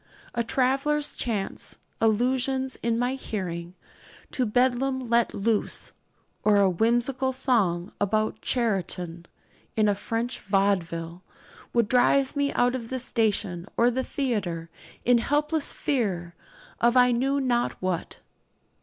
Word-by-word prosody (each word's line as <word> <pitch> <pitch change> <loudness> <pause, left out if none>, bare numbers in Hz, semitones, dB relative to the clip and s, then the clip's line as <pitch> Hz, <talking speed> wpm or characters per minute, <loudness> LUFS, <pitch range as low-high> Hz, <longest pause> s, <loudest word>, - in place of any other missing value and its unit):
A 235 - 0
traveller's 275 +5 +1
chance 210 -5 -3 0.2
allusion 255 +4 +2
in 230 0 0
my 245 +2 0
hearing 180 -8 -5 0.6
to 250 -3 0
'Bedlam 255 +2 +1
let 235 0 +3
loose,' 210 +1 0 0.5
or 210 -1 +4
a 200 -1 +5
whimsical 240 +7 +1
song 215 -9 +1
about 215 +2 0
'Charenton' 180 -7 -2 0.5
in 215 -1 +3
a 205 - +4
French 225 +4 -3
vaudeville, 180 -4 0 0.5
would 235 -3 +2
drive 260 +3 +3
me 285 0 +1
out 245 0 +2
of 235 -3 -5
the 260 - -2
station 210 -7 0
or 240 +1 +4
the 260 +2 -1
theatre 195 - -2 0.3
in 245 -1 +5
helpless 300 +4 +1
fear 190 - -1 0.5
of 235 +2 +3
I 250 0 +6
knew 270 +4 +1
not 245 -3 +1
what. 185 -2 -3
235 Hz, 125 wpm, -26 LUFS, 195-260 Hz, 0.6 s, I